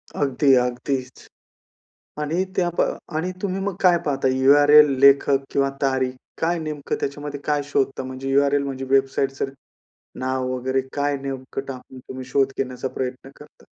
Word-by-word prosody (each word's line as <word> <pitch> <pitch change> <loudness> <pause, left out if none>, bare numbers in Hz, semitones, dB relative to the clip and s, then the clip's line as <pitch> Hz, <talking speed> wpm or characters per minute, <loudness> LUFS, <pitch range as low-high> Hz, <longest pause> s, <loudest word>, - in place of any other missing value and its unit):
अगदी, 135 0 +2
अगदीच 125 +1 -2 0.9
आणि 165 +5 0
त्या 175 -2 +2
प - - +5 0.3
आणि 175 +4 -1
तुम्ही 195 -1 -2
मग 195 -1 -2
काय 180 -2 +5
पाहता? 135 -2 +1
URL 145 +3 +6
लेखक 140 0 +5
किंवा 140 0 +1
तारीख 130 -1 +1 0.3
काय 170 +1 +1
नेमकं 150 -3 -4
त्याच्यामध्ये 145 0 -4
काय 145 -1 0
शोधता 135 0 0
म्हणजे 130 +1 -5
URL 140 +1 +3
म्हणजे 135 -1 -4
वेबसाईटचं 135 0 +1 0.7
नाव 130 0 -1
वगैरे 130 +1 -1
काय 145 0 0
नेमकं 135 -1 -5
टाकून 130 -1 -9
तुम्ही 130 0 -9
शोध 135 +1 +1
घेण्याचा 130 -1 -3
प्रयत्न 130 +1 -5
करता? - - -17
135 Hz, 145 wpm, -22 LUFS, 130-145 Hz, 0.9 s, URL